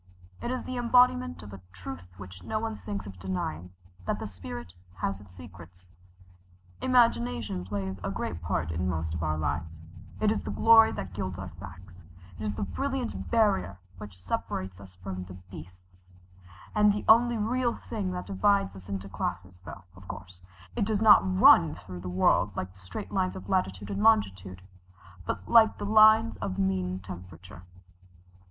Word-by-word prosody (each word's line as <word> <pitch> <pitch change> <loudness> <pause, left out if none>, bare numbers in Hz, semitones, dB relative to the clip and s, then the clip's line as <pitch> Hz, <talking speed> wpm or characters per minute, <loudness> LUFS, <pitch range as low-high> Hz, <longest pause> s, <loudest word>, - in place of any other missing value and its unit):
It - - -3
is 255 0 -2
the 255 - -5
embodiment 235 - +3
of 100 -1 -10
a 95 - -10
truth 90 -1 -8
which 90 -2 -10
no 215 - -2
one 225 0 -3
thinks 205 -1 -6
of 95 -2 -10
denying 90 -2 -4 0.4
that - - 0
the - - -6
spirit 90 -3 -8 0.2
has 95 +1 -3
its 100 -3 -16
secrets. 90 0 -14 0.9
Imagination 120 - +2
plays 95 0 -4
a 100 - -2
great 90 -3 -4
part 80 -2 -2
in 90 +3 -1
most 80 -2 -2
of 80 - -3
our 75 -1 -1
lives 80 +2 -3 0.4
it 215 -1 +3
is 220 - -1
the - - -6
glory 225 0 +6
that 95 -1 -6
gilds 95 -2 -4
our - - -6
facts 90 -1 -12 0.4
it - - -5
is 105 -1 -1
the - - -3
brilliant 270 - -3
barrier 205 - +2 0.2
which 105 -3 -10
separates 90 0 -4
us 95 -2 -13
from 90 0 -6
the 90 0 -10 0.2
beasts, 90 +1 -14 0.6
and 210 -1 +5
the 205 0 -3
only 235 +1 +6
real 240 +3 0
thing 205 -5 -4
that 180 0 -4
divides 95 0 +1
us 95 +1 -12
into 100 0 -4
classes, 90 0 -5
though, 100 +1 -9
of 90 0 -15
course, 90 -1 -9 0.3
it - - +1
does 215 +1 0
not 215 -2 +9 0.2
run 80 -1 +7
through 90 0 -9
the 90 +1 -6
world 95 +2 +2
like 95 0 -4
straight 95 0 -8
lines 90 0 0
of 95 +1 -9
latitude 95 +2 -1
and 100 0 -2
longitude, 95 -4 +2 0.6
but 95 -2 -3
like 220 -2 +6
the - - -4
lines 215 +2 +6
of 95 - -4
mean 95 -1 0
temperature." 90 -1 -11
95 Hz, 175 wpm, -28 LUFS, -, 0.9 s, not